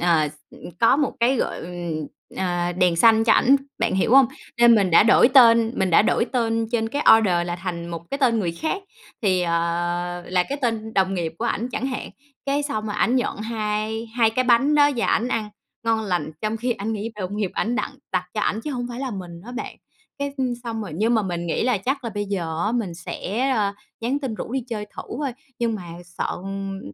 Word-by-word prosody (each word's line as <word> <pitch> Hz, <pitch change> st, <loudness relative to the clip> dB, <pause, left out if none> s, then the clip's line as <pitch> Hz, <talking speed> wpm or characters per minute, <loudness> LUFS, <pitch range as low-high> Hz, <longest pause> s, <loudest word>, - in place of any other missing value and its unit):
ờ, 165 Hz, -3 st, +3 dB
s -, -, -12 dB, 0.2 s
ừm, -, -, -11 dB
có 230 Hz, -, +5 dB
một 290 Hz, -1 st, 0 dB
cái, 255 Hz, +3 st, +3 dB
gọi, -, -, -1 dB
ừm, 170 Hz, -3 st, -5 dB, 0.3 s
ờ, 175 Hz, -1 st, -1 dB
đèn 180 Hz, -1 st, +2 dB
xanh 225 Hz, +4 st, +5 dB
cho 230 Hz, -, +5 dB
ảnh, 270 Hz, +3 st, +5 dB, 0.2 s
bạn 230 Hz, -2 st, 0 dB
hiểu 190 Hz, +3 st, +1 dB
hông? 270 Hz, -2 st, +8 dB, 0.3 s
Nên 240 Hz, -1 st, +8 dB
mình 195 Hz, -5 st, +2 dB
đã 165 Hz, -, +7 dB
đổi 235 Hz, +2 st, +6 dB
tên 230 Hz, -4 st, +6 dB
mình 190 Hz, -1 st, +1 dB
đã 165 Hz, -, +6 dB
đổi 225 Hz, -, +2 dB
tên 230 Hz, -2 st, 0 dB
trên 225 Hz, -2 st, +1 dB
cái 285 Hz, +5 st, -2 dB
order 175 Hz, -5 st, +1 dB
là 175 Hz, 0 st, -3 dB
thành 175 Hz, -2 st, -5 dB
một 170 Hz, 0 st, -7 dB
cái 275 Hz, -, -2 dB
tên 245 Hz, -5 st, +3 dB
người 175 Hz, -5 st, -1 dB
khác, 320 Hz, -, -3 dB, 0.4 s
thì, 185 Hz, -4 st, +2 dB
ờ, 170 Hz, -, -1 dB, 0.7 s
là 180 Hz, 0 st, +2 dB
cái 280 Hz, -, -3 dB
tên 220 Hz, -2 st, -2 dB
đồng 190 Hz, 0 st, +2 dB
nghiệp 170 Hz, -3 st, -2 dB
của 230 Hz, -, -2 dB
ảnh 235 Hz, 0 st, -1 dB
chẳng 255 Hz, +1 st, -3 dB
hạn, 260 Hz, -1 st, -4 dB, 0.4 s
cái 280 Hz, +1 st, +1 dB
xong 220 Hz, -7 st, -3 dB
rồi 210 Hz, -, -3 dB
ảnh 245 Hz, -, +2 dB
nhận 250 Hz, -, -1 dB
hai 220 Hz, 0 st, -2 dB
hai 230 Hz, -2 st, +4 dB
cái 255 Hz, +3 st, 0 dB
bánh 255 Hz, +4 st, +4 dB
đó 290 Hz, 0 st, +5 dB
và 235 Hz, -, +1 dB
ảnh 235 Hz, -, +1 dB
ăn 220 Hz, -3 st, -1 dB, 0.4 s
ngon 225 Hz, -1 st, +2 dB
lành 180 Hz, -5 st, -1 dB
trong 215 Hz, +1 st, -1 dB
khi 245 Hz, +2 st, -1 dB
ảnh 215 Hz, 0 st, -4 dB
nghĩ 215 Hz, +1 st, -4 dB
đồng 200 Hz, -1 st, -5 dB
nghiệp 205 Hz, -4 st, -1 dB
ảnh 235 Hz, +2 st, 0 dB
đặng -, -, -1 dB, 0.2 s
đặt 180 Hz, -1 st, 0 dB
cho 210 Hz, -, -1 dB
ảnh 210 Hz, +1 st, 0 dB
chứ 295 Hz, -, -5 dB
hông 245 Hz, -2 st, -3 dB
phải 240 Hz, +1 st, -6 dB
là 270 Hz, -2 st, -3 dB
mình 175 Hz, -5 st, -7 dB
á 245 Hz, -, -8 dB
bạn. 250 Hz, -, -6 dB, 0.4 s
Cái, 280 Hz, 0 st, -3 dB
ưm, 255 Hz, -3 st, 0 dB
xong 225 Hz, -2 st, -3 dB
rồi 190 Hz, -7 st, -7 dB
nhưng 220 Hz, +7 st, +1 dB
mà 220 Hz, -, +2 dB
mình 175 Hz, -3 st, -3 dB
nghĩ 165 Hz, -, -1 dB
là 245 Hz, -4 st, +2 dB
chắc 265 Hz, +7 st, -2 dB
là 230 Hz, -, -3 dB
bây 205 Hz, -1 st, -3 dB
giờ 170 Hz, -5 st, -3 dB
á, 215 Hz, -, 0 dB
mình 220 Hz, -8 st, -2 dB
sẽ, 220 Hz, +8 st, -3 dB
ơ, 210 Hz, -6 st, +1 dB, 0.3 s
nhắn 245 Hz, +5 st, 0 dB
tin 265 Hz, -6 st, -4 dB
rủ 225 Hz, -, -6 dB
đi 265 Hz, -, 0 dB
chơi 215 Hz, -3 st, -3 dB
thử -, -, -4 dB, 0.2 s
thôi, 285 Hz, -3 st, -2 dB, 0.3 s
nhưng 235 Hz, -2 st, 0 dB
mà 205 Hz, -, -6 dB, 0.2 s
sợ 170 Hz, 0 st, -4 dB, 0.2 s
ừm, 195 Hz, 0 st, -5 dB
220 Hz, 240 wpm, -23 LUFS, 185-245 Hz, 0.7 s, hông